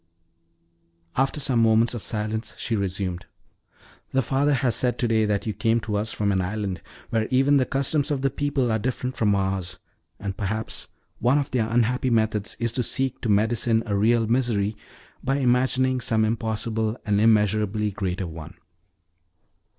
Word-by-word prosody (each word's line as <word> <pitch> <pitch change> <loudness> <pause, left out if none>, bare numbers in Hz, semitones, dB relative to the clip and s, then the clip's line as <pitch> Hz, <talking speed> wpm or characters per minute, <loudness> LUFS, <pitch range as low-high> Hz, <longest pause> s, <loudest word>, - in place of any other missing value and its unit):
After 135 +3 +1
some 135 -5 +1
moments 115 +1 +4
of 120 - -6
silence, 110 0 -3
she 115 - -2
resumed: 95 -3 -3 0.9
"The 135 0 +2
father 140 +3 +2
has 125 -2 +1
said 125 +1 +1
to 120 - 0
day 110 -1 +2
that 105 -1 -1
you 110 - -2
came 115 +3 +1
to 105 -1 -3
us 105 +2 0
from 100 -1 0
an 95 -1 +1
island 95 -1 -3 0.3
where 110 -1 +1
even 135 +2 +4
the 130 - +1
customs 140 +2 0
of 140 -3 -1
the 135 - +2
people 140 -4 0
are 110 - +1
different 125 +2 -3
from 105 -3 +2
ours; 95 -2 -2 0.4
and 100 -1 -4
perhaps 110 +2 -4 0.3
one 125 +5 +3
of 145 -1 -1
their 115 -4 0
unhappy 120 +2 +1
methods 110 -3 0
is 115 -1 0
to 125 - -1
seek 130 +2 0
to 115 - -2
medicine 110 +2 +2
a 105 -3 -1
real 115 +3 +3
misery 110 -3 +1 0.5
by 135 +1 +1
imagining 130 0 +2
some 110 -2 +1
impossible 110 0 -1
and 105 -1 +2
immeasurably 105 -1 +2
greater 95 -1 -3
one. 80 +1 -9
110 Hz, 165 wpm, -24 LUFS, 105-125 Hz, 0.9 s, moments